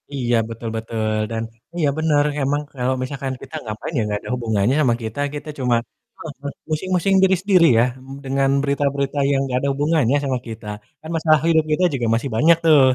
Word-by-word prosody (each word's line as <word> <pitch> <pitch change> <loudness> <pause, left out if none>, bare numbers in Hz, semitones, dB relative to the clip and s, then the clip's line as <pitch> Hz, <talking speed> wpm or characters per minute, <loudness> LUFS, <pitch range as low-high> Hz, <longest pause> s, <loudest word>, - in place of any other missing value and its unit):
Iya, 120 -2 0
betul 115 0 -5
betul, 110 -1 -2 0.2
dan 115 0 -2 0.3
iya 155 -4 +2
benar, 155 -2 +3 0.2
emang 145 +2 +1
kalau 130 0 0
misalkan 135 0 -4
kita - - -9
ngapain 110 +8 -6
ya, 115 - +2
nggak 105 0 -2
ada - - -9
hubungannya 110 0 +1
sama 120 -4 +3
kita 110 +5 -5
kita 150 +1 -6
cuma 125 -2 +2 0.4
heeh 160 -2 -6
heeh, 140 - -3 0.2
pusing-pusing 185 +4 +1
diri 190 0 +5
sendiri, 190 -4 +4
ya, - - +5 0.2
mmm, 135 +1 -10
dengan 135 0 +1
berita-berita 140 0 -1
yang 135 - +2
nggak 125 -2 -1
ada 140 - -1
hubungannya 145 -2 +2
sama 130 -2 0
kita. 110 -1 -8 0.3
Kan 160 - -9
masalah 155 -1 +4
hidup 160 -2 +4
kita 165 +4 +2
juga 120 -3 -1
masih 130 +4 -2
banyak 165 +6 +5
tuh. 155 -3 +7
140 Hz, 195 wpm, -21 LUFS, 120-155 Hz, 0.4 s, tuh